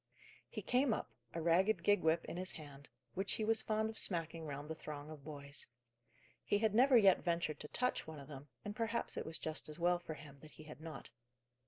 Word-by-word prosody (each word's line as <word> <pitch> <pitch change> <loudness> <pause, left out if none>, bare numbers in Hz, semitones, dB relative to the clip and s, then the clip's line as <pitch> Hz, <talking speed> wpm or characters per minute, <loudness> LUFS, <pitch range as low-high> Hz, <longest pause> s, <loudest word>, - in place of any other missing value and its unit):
He - - -5
came 250 -2 +3
up, - - -5 0.2
a - - -1
ragged 185 +6 +3
gig 205 0 +4
whip 160 +1 +2
in - - -5
his 185 +1 -3
hand, 145 -2 -10 0.2
which 190 +1 0
he 220 - 0
was 220 0 +5
fond 220 0 +1
of 220 0 +4
smacking 165 -3 -1
round 145 0 -5
the 160 - -3
throng 150 -1 -7
of 150 -3 -10
boys. 145 -1 -3 0.8
He 205 - +2
had 215 0 +2
never 255 +3 +7
yet 195 -4 +6
ventured 170 -3 0
to - - -5
touch 250 +3 0
one 160 -1 -7
of 140 - -10
them, 145 -1 -9 0.2
and 205 0 -4
perhaps 230 +1 +1
it - - -3
was 160 - -3
just 155 -1 -4
as 150 - -6
well 175 +1 +3
for 165 -2 -6
him 140 -1 -12
that 150 +2 -14
he - - -12
had 155 0 -11
not. 160 -7 -8
165 Hz, 225 wpm, -37 LUFS, 150-205 Hz, 0.8 s, never